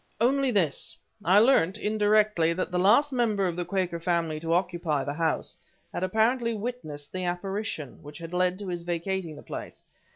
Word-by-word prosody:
"Only 270 +3 +3
this: 180 - 0 0.3
I 185 +3 +5
learnt, 210 -5 +4
indirectly, 210 -5 +2
that 185 +1 -3
the 180 - 0
last 240 +10 +4
member 220 -6 +1
of 175 -2 -1
the 175 - -2
Quaker 180 -2 -1
family 165 -2 0
to 165 +1 -3
occupy 170 -5 0
the 145 - -3
house 165 +1 -1 0.4
had - - -3
apparently 225 +5 +1
witnessed 200 -11 -5
the 185 -1 -3
apparition, 180 - -4
which 145 0 -10
had 170 0 -8
led 180 0 +2
to 200 -1 -7
his 175 -1 -3
vacating 175 -1 -3
the - - -11
place. - - -7
185 Hz, 175 wpm, -27 LUFS, 170-215 Hz, 0.4 s, I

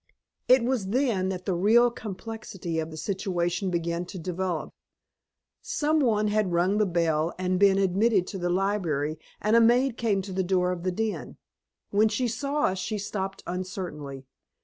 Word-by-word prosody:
It 255 -1 +6
was 240 -5 0
then 220 -5 +1
that 185 -1 -4
the 190 - 0
real 225 +7 +4
complexity 205 -5 -5
of 160 0 -3
the 160 - -9
situation 185 0 -1
began 170 0 -1
to 190 - -8
develop. 180 -1 -3 0.9
Some 310 +1 0
one 215 -6 +2
had 210 -3 +1
rung 180 +4 +2
the 210 - +3
bell 165 -2 0
and 185 0 0
been 195 -1 +5
admitted 195 +1 +2
to 195 - -5
the 175 0 -1
library 175 -6 0 0.2
and 215 +2 +2
a 230 - +7
maid 240 +2 +3
came 205 -4 +1
to 190 0 -7
the 190 - 0
door 180 0 +1
of 180 -1 -4
the 185 +1 -1
den. 220 +3 -3 0.5
When 210 +2 +4
she 245 +4 0
saw 280 +5 -2
us 190 0 +1
she 215 +3 -2
stopped 195 -1 -4
uncertainly. 175 -7 -5
190 Hz, 170 wpm, -27 LUFS, 175-215 Hz, 0.9 s, a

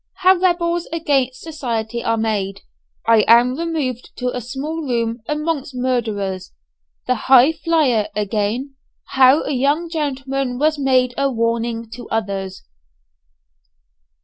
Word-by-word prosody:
HOW 375 0 +4
REBELS 345 -1 +1
AGAINST 275 -6 0
SOCIETY 235 -7 -4
ARE 230 - +1
MADE 205 -3 -2 0.4
I 225 -1 +5
AM 240 +2 +5
REMOVED 300 -7 -3
TO 250 0 -3
A 250 - -3
SMALL 285 +7 -5
ROOM 230 -1 -1
AMONGST 300 -2 -2
MURDERERS 215 -7 -2 0.5
THE - - +2 0.2
"HIGHFLYER" 270 -3 +4
AGAIN 210 +6 -2 0.4
HOW 265 +3 +5
A - - -3
YOUNG 290 +6 +1
GENTLEMAN 275 -4 -2
WAS 305 +2 +1
MADE 255 -2 +2
A 275 0 +2
WARNING 230 -1 -2
TO 245 - -9
OTHERS. 195 -3 -3
255 Hz, 120 wpm, -19 LUFS, 230-295 Hz, 0.5 s, I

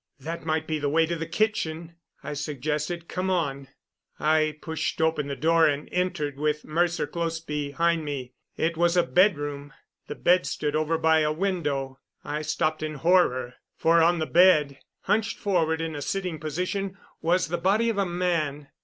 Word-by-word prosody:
"That 165 +5 -6
might 160 0 0
be 155 -1 -2
the 145 -1 0
way 160 +2 +3
to 170 +1 -2
the 165 -1 -4
kitchen," 170 -4 -1 0.3
I - - -4
suggested. 150 +4 -3
"Come 185 +1 -2
on." 140 -7 -1 0.5
I 155 0 +2
pushed 160 0 -3
open 160 -2 +1
the 140 - -3
door 165 +2 +4
and 145 0 -1
entered, 175 -6 -1
with 150 0 -1
Mercer 170 +1 0
close 165 +2 -3
behind 160 +2 -1
me. 135 -4 -5 0.2
It 165 +1 0
was 175 +1 +2
a 175 - +5
bedroom. 145 -6 +1 0.3
The - - -5
bed 180 +1 +3
stood 150 0 -2
over 155 +1 +1
by 160 0 +4
a 150 -1 +2
window. 150 -7 -2 0.2
I 150 +1 -3
stopped 155 0 -1
in 155 0 -3
horror, 135 -6 +2 0.2
for 165 0 +4
on 170 +2 +4
the 160 - -1
bed, 155 -5 +4 0.2
hunched 220 0 0
forward 165 -5 +1
in 165 -1 -3
a 145 - -5
sitting 180 0 -3
position, 185 +5 -3 0.2
was 175 +1 +1
the 175 +1 -1
body 200 +6 +2
of 225 -3 0
a - - +3
man! 165 -5 -1
160 Hz, 175 wpm, -26 LUFS, 150-175 Hz, 0.5 s, a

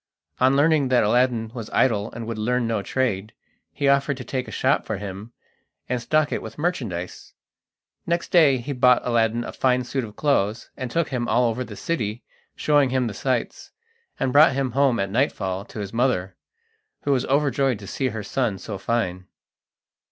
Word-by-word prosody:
On 130 +1 +4
learning 150 -1 +3
that 125 -2 +3
Aladdin 115 0 +1
was 115 -4 -6
idle 110 -5 +1
and 115 0 -6
would 115 -1 -5
learn 125 +2 0
no 115 -2 -1
trade, 110 -3 -2 0.4
he 140 - -1
offered 140 0 +2
to 130 - -6
take 130 0 -3
a - - -8
shop - - +1
for - - -3
him 100 +3 -7 0.6
and 125 -1 -1
stock 155 +4 +1
it - - -2
with - - -9
merchandise. 120 - -4 0.7
Next 170 0 -1
day 155 -7 +5
he 130 +4 -5
bought 125 -1 +4
Aladdin 115 -1 +1
a - - -7
fine 125 -1 +1
suit 130 +1 -3
of 105 -2 -9
clothes, 115 -7 0
and 130 -2 -5
took 165 +5 0
him 125 -3 -2
all 120 0 +3
over 115 +2 -2
the - - -9
city, 120 - -3 0.3
showing 145 -3 +3
him 130 -1 +1
the 110 - -3
sights, 125 +3 -3 0.5
and 130 -1 0
brought 145 -1 +7
him 135 -1 -1
home 135 -1 +2
at 100 0 -1
nightfall 100 -6 -1
to - - -12
his 100 -1 -5
mother, 115 -7 0 0.7
who 145 - 0
was 130 -2 +1
overjoyed 135 -3 +1
to 100 - -11
see 130 +7 -2
her 110 -3 -4
son 110 0 -1
so 100 0 -7
fine. 95 -5 -2
125 Hz, 190 wpm, -23 LUFS, 110-135 Hz, 0.7 s, brought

